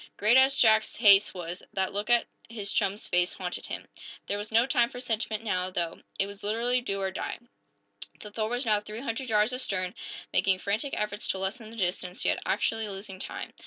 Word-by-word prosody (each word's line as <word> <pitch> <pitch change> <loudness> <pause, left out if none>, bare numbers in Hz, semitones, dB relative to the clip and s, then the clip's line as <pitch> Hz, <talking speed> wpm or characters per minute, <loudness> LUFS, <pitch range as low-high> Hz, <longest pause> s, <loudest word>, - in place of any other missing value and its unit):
Great 215 +4 +4
as 265 +1 +6
Jack's 220 -1 +4
haste 205 -3 +7
was, 175 0 -6
that 190 -1 -1
look 205 +3 -3
at 240 -1 +4 0.2
his 210 -3 -4
chum's 200 0 0
face 180 0 +2
haunted 180 -1 -4
him. - - -5 0.4
There 205 - -2
was 205 +1 -6
no 230 +2 +5
time 245 -4 +3
for 245 - -8
sentiment, 225 -3 -2
now, 185 -4 0
though. 170 -2 -3 0.2
It 195 - +2
was 200 0 -10
literally 235 +4 0
do 195 -5 -3
or 190 -1 -1
die! - - -4 0.8
The 210 - -9
"Thor" 215 +1 -2
was 245 +2 -1
now 215 -2 +3
three 210 +2 -7
hundred 255 0 -3
yards 215 +2 +3
astern, 185 -7 -1 0.4
making 190 -1 +3
frantic 210 +9 -2
efforts 210 0 -2
to - - 0
lessen 195 +4 -3
the 225 - -11
distance, 180 -1 -2
yet - - +2
actually 225 -1 0
losing 195 -1 -7
time. - - -6
210 Hz, 200 wpm, -28 LUFS, 195-230 Hz, 0.8 s, haste